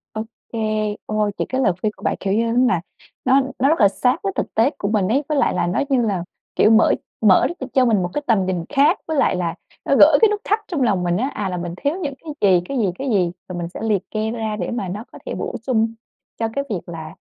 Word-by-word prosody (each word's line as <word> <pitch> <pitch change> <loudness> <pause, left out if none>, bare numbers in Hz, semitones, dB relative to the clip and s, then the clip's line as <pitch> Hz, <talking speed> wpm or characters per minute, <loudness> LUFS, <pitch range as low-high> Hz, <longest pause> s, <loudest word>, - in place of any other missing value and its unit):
Ô 215 - -2 0.3
kê. 215 -2 -1
Ôi, 215 -1 0
những - - -2
cái 260 0 -1
lời 190 -8 +3
khuyên 215 - 0
của - - -17
bạn, - - +1
kiểu 195 0 -1
như 225 +3 +2
nó 235 - 0
nà, 180 -7 +1 0.4
nó 265 +1 +5 0.2
nó 270 +3 +4
rất 320 - +2
là 200 - +7
sát 250 - +1
với 390 -1 -1
thực - - -3
tế 230 +4 +3
của 200 - -2
mình 205 -3 +1
ấy, 265 +8 +1
với 300 - +1
lại - - +2
là 175 -1 0
nó, 180 - 0
như 265 -3 +3
là, 195 -5 -1 0.3
kiểu, 215 - +5
mở 225 0 +5 0.3
mở 215 +2 +5
r 320 -5 -6
cho 260 -1 +4
mình 220 -5 +3
một 175 - -2
cái 295 - -1
tầm 210 -5 +3
nhìn 180 -3 -2
khác 290 +6 +3
với 315 -2 -1
lại 275 - +3
là 175 -2 -2 0.3
nó - - +3
gỡ - - +8
cái 445 - +7
nút 415 0 -2
thắt 425 +2 +1
trong 325 -6 -2
lòng 205 -7 +2
mình 175 0 +1
á, 260 +5 0
à, 205 -2 -3
là 180 - -3
mình 175 -1 -4
thiếu 285 - -1
những 285 -4 -3
cái 305 +2 -9 0.2
gì, 175 - +4
cái 275 - -2
gì, 220 -5 +2
cái 275 - -2
gì. 185 -6 +2 0.2
Rồi 180 - -5
mình 170 -1 -4
sẽ - - -9
liệt 210 -4 +1
kê 215 0 -1
ra 220 -2 -3
để 175 - -3
mà 235 -5 -3
nó 200 +5 -5
có - - -12
thể - - -4
bổ - - -4
sung 225 -3 0 0.5
cho 225 - +1
cái 280 - 0
việc 200 -5 -1
là, 160 -2 -8
220 Hz, 280 wpm, -21 LUFS, 190-265 Hz, 0.5 s, gỡ